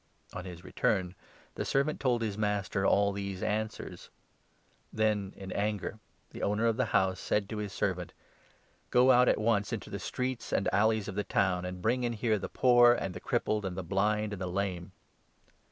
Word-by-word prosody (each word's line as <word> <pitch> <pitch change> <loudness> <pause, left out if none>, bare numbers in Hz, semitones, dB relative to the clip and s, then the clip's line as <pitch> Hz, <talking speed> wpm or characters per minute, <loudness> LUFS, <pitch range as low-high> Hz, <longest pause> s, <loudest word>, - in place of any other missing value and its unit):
On - - -5
21 - - -12
his 85 0 -12
return 95 -2 0 0.4
the - - -3
servant 140 +3 0
told 120 -4 +1
his 105 -3 -2
master 105 -2 0
all 100 0 +3
these 100 -1 -4
answers. 110 +1 -3 0.8
Then 105 -3 0
in 95 -1 -8
anger 105 +1 -2 0.3
the - - -8
owner 105 +3 +1
of 115 -1 +3
the - - +1
house 95 -1 +1
said 105 -2 0
to 110 - -4
his 105 -2 -4
servant 90 -3 -2 0.4
' - - -37
Go 125 +1 +5
out 125 0 +6
at - - +3
once 105 -1 +1
into 115 -4 -5
the 100 - -4
streets 125 +4 -3
and 95 - +1
alleys 110 +1 +2
of 105 - -4
the 105 +2 -1
town, 95 -3 +1
and 90 0 -6
bring 125 +3 +1
in 120 -1 0
here 110 -1 0
the - - -5
poor, 120 -1 +6
and 95 -6 -3
the 90 - -7
crippled, 110 -2 -1
and 95 -1 -4
the 95 - -3
blind, 105 +4 0
and 95 - -6
the 95 - -2
lame.' 90 -1 -3
105 Hz, 200 wpm, -30 LUFS, 95-110 Hz, 0.8 s, out